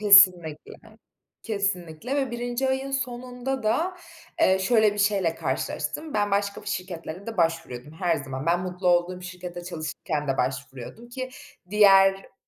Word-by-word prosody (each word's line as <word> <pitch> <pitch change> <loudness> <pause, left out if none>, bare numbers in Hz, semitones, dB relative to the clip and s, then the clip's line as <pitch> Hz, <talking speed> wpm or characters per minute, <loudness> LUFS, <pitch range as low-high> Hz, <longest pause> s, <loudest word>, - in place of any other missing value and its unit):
Kesinlikle, 185 -7 +6 0.7
kesinlikle 200 - -2
ve 270 -3 0
1. 245 +2 -2
ayın 265 +1 -1
sonunda 255 -1 -3
da, 335 +12 0 0.4
eee, 190 0 +5
şöyle 215 +1 +4
bir 205 - -7
şeyle 195 -5 +2
karşılaştım: 310 -5 -3
Ben 205 -1 +1
başka 200 +1 0
bir - - -17
şirketlere 180 -1 -5
de 225 -2 -5
başvuruyordum, 165 -5 -1
her 170 0 0
zaman; 135 0 -6
ben 175 +1 +3
mutlu 180 0 -2
olduğum 175 +1 +2
şirkette 180 -1 -7
çalışırken 155 -3 -4
de 135 - +1
başvuruyordum 130 - -4
ki 255 +1 -5 0.4
diğer 195 -2 +5
195 Hz, 140 wpm, -26 LUFS, 170-230 Hz, 0.7 s, Kesinlikle